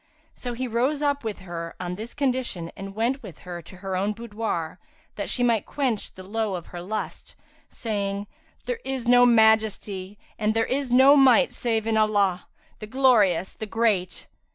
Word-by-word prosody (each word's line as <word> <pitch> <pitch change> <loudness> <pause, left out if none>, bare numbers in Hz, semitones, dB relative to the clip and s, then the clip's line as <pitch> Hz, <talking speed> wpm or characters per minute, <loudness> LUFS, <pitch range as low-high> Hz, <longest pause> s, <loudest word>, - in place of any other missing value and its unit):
So 245 -1 -5
he 255 +2 -3
rose 260 +6 0
up 285 -1 +1
with 215 -3 -4
her, 170 -2 -6
on 180 -1 -4
this 220 +5 -8
condition, 255 -11 -1
and 195 0 -8
went 245 +5 0
with 195 - -11
her 175 -1 -6
to 175 +3 -13
her 190 0 -4
own 200 +3 0
boudoir, 210 -7 -4 0.4
that - - -4
she 245 - 0
might 230 -3 +2
quench 255 -7 -2
the 185 - -10
lowe 210 0 -2
of 175 - -6
her 175 - -5
lust, 215 +5 -5 0.3
saying, 200 -2 -3 0.4
"There - - -3
is 265 -3 -3
no 245 0 +7
Majesty, 220 -4 +2 0.2
and 215 0 +1
there 225 - +2
is 270 0 -1
no 265 +3 +7
Might 270 -1 +5
save 225 -2 -1
in 225 -1 +1
Allah, 205 -4 +2 0.3
the 215 - -7
Glorious, 215 -8 +3
the 220 - -6
Great! 210 -5 0
220 Hz, 175 wpm, -25 LUFS, 195-245 Hz, 0.4 s, no